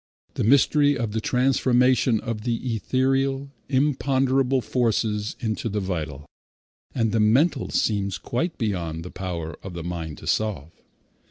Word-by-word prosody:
The - - -2
mystery 145 +4 +4
of 115 -3 -2
the 110 +1 -2
transformation 125 -1 +3
of 115 -2 -4
the 120 +1 -2
ethereal, 135 +4 0 0.2
imponderable 135 -1 +2
forces 110 -4 0
into 115 -1 -2
the 105 0 -1
vital 80 -7 -4 0.7
and 115 -4 +1
the 115 - +1
mental 130 +6 +3
seems 100 -3 0
quite 165 +8 -3
beyond 85 -7 -2
the 90 - -8
power 85 -4 -5
of 95 -2 -8
the 85 - -5
mind 85 -3 -5
to - - -11
solve. 100 -9 -1
115 Hz, 140 wpm, -24 LUFS, 95-130 Hz, 0.7 s, mystery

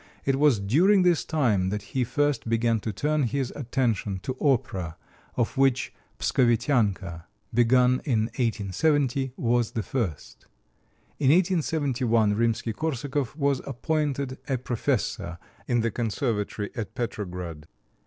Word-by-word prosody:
It 135 -1 +2
was 145 -4 +4
during 175 - +4
this 175 -3 +3
time 115 - +1
that 105 +1 -3
he 130 - +2
first 145 0 0
began 115 0 +2
to 110 - -3
turn 150 +9 0
his 130 0 -1
attention 115 -7 -1
to 130 - -3
opera, 95 - 0 0.4
of 120 +2 -1
which 135 -1 +2 0.2
"Pskovitianka," 110 - +1 0.3
begun 125 +2 +4
in 120 -6 +1
1870, 130 - 0
was 120 -1 +1
the 110 - -2
first. 105 - -4 0.7
In 135 - +2
1871 140 - +2
Rimsky 115 +1 0
Korsakov 140 -2 -2
was 140 -3 +1
appointed 140 -1 -2
a 135 - 0
professor 120 -8 -2 0.3
in 120 -2 +2
the 115 0 0
Conservatory 105 -2 -2
at 115 -5 -5
Petrograd. 90 -9 -5
120 Hz, 125 wpm, -26 LUFS, 110-140 Hz, 0.7 s, was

